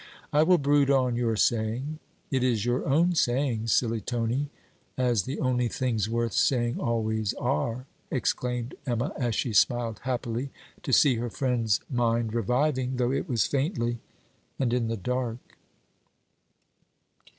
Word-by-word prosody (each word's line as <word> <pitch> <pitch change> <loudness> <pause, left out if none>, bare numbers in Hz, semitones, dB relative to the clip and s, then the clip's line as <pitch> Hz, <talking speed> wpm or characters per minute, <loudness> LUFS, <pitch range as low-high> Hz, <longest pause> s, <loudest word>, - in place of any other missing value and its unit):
I 150 - +5
will 180 +3 +5
brood 145 -1 +3
on 130 -3 +3
your 120 -2 0
saying.' 120 +8 0 0.3
'It 130 -2 +1
is 120 -4 +1
your 120 +1 0
own 165 +6 +3
saying, 120 -6 +1
silly 115 -1 +1
Tony, 120 +5 -1 0.5
as 120 -6 +1
the 135 +4 -4
only 125 -1 +1
things 115 -4 -1
worth 115 0 -1
saying 120 -3 +1
always, 110 -2 -1
are!' 125 -1 -1 0.2
exclaimed 125 -1 -1
Emma, 120 +3 -1
as 120 -5 -1
she 120 - -1
smiled 115 0 +2
happily 125 0 -2 0.3
to - - -4
see 130 0 +5
her 120 +1 -2
friend's 115 -4 0
mind 115 -3 0
reviving, 130 +3 0
though 125 0 +1
it 140 +5 -2
was 115 -5 +2
faintly 120 -5 -1 0.6
and 120 -3 0
in 120 -2 +1
the 115 0 -2
dark. 125 +2 -4
120 Hz, 140 wpm, -27 LUFS, 115-130 Hz, 0.6 s, I